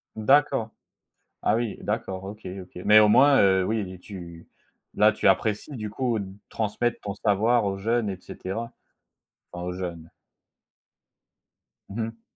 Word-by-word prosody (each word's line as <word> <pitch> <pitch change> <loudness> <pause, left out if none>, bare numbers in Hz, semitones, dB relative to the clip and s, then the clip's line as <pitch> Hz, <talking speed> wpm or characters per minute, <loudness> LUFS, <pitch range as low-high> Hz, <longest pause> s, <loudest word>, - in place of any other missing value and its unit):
D'accord. 115 +1 +3 0.7
Ah 105 - +2
oui, 115 -3 -2
d'accord, 95 -3 -3
OK, 105 +1 -9
OK, 90 0 -11
mais 105 +1 +7
au 105 - +6
moins, 140 +5 +6
heu, 95 -1 +4
oui 95 -4 -2
tu 85 -4 -10 0.5
là 105 +1 +5
tu 105 - -2
apprécies, 110 +8 +1
du 110 -1 -4
coup 115 +1 -1
d 100 - -4 0.2
transmettre 115 +2 -1
ton 100 -1 -5
savoir 110 +3 +2
aux 95 -1 -2
jeunes 115 0 0
et 95 - -4
cetera. 115 +8 -6 0.8
Enfin, 90 0 -6
aux 90 - -3
jeunes. 85 -3 -6 1.8
Mmh 110 +4 -4
mh. 115 0 -10
105 Hz, 145 wpm, -25 LUFS, 95-115 Hz, 1.8 s, mais